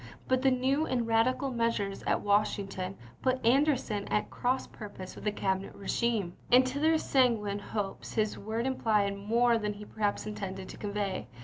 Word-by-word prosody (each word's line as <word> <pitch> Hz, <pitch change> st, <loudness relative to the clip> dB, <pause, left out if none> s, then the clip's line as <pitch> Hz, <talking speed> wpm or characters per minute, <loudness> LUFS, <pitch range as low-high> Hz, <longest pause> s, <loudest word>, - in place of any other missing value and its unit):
But 260 Hz, 0 st, +2 dB
the 270 Hz, -, +5 dB
new 265 Hz, +4 st, +1 dB
and 245 Hz, -2 st, 0 dB
radical 250 Hz, +4 st, +2 dB
measures 230 Hz, -5 st, -1 dB
at -, -, +2 dB
Washington 200 Hz, -2 st, 0 dB, 0.2 s
put 255 Hz, 0 st, +1 dB
Anderson 250 Hz, -5 st, +2 dB
at 210 Hz, -, -1 dB
cross 255 Hz, +2 st, 0 dB
purpose 200 Hz, -4 st, -9 dB
with -, -, -11 dB
the 210 Hz, -, +2 dB
Cabinet 190 Hz, -1 st, -2 dB
regime, 205 Hz, -2 st, -1 dB, 0.2 s
and 255 Hz, +1 st, +7 dB
to 260 Hz, +2 st, -2 dB
their 320 Hz, +1 st, +4 dB
sanguine 230 Hz, -9 st, +2 dB
hopes 205 Hz, -1 st, -4 dB
his 215 Hz, -1 st, +1 dB
words 220 Hz, +3 st, -3 dB
implied 210 Hz, -6 st, +1 dB
more 230 Hz, +4 st, +2 dB
than 210 Hz, -1 st, -2 dB
he 210 Hz, 0 st, -10 dB
perhaps 210 Hz, -2 st, -1 dB
intended 195 Hz, -3 st, -5 dB
to -, -, -9 dB
convey. 200 Hz, -5 st, -3 dB
215 Hz, 170 wpm, -30 LUFS, 200-255 Hz, 0.2 s, and